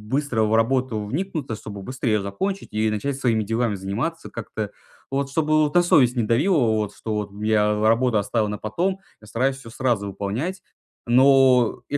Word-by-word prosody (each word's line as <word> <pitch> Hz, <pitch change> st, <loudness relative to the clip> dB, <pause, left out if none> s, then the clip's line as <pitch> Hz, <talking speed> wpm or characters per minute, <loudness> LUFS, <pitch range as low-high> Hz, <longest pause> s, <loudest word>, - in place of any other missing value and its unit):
быстро 140 Hz, -6 st, 0 dB
в 110 Hz, +1 st, +2 dB
работу 115 Hz, -2 st, +1 dB
вникнуться, 145 Hz, -, -3 dB
чтобы 100 Hz, -2 st, -9 dB
быстро 130 Hz, +2 st, -3 dB
ее 105 Hz, -1 st, +2 dB
закончить 190 Hz, -, -3 dB
и 110 Hz, +1 st, +1 dB
начать 110 Hz, +6 st, -2 dB
своими 115 Hz, -5 st, +1 dB
делами 115 Hz, +1 st, -1 dB
заниматься 110 Hz, -, -4 dB
как-то 110 Hz, -2 st, -5 dB, 0.4 s
вот, 135 Hz, 0 st, -1 dB
чтобы 155 Hz, 0 st, +2 dB
на 175 Hz, -, +6 dB
совесть 135 Hz, -9 st, +4 dB
не 120 Hz, -, +2 dB
давила 145 Hz, -, +2 dB
вот, 110 Hz, -5 st, +1 dB
что 110 Hz, -, -5 dB
вот 105 Hz, -1 st, -3 dB
я 105 Hz, -1 st, +2 dB
работу 115 Hz, +1 st, +3 dB
оставил 105 Hz, +1 st, 0 dB
на 105 Hz, -, -3 dB
потом, 175 Hz, -, -2 dB, 0.2 s
я 110 Hz, -, -15 dB
стараюсь 130 Hz, +5 st, 0 dB
всё 135 Hz, -4 st, -12 dB
сразу 115 Hz, -4 st, -1 dB
выполнять. 110 Hz, -, -4 dB, 0.5 s
Но 130 Hz, -1 st, +4 dB
я 145 Hz, -, 0 dB
120 Hz, 175 wpm, -23 LUFS, 105-140 Hz, 0.5 s, на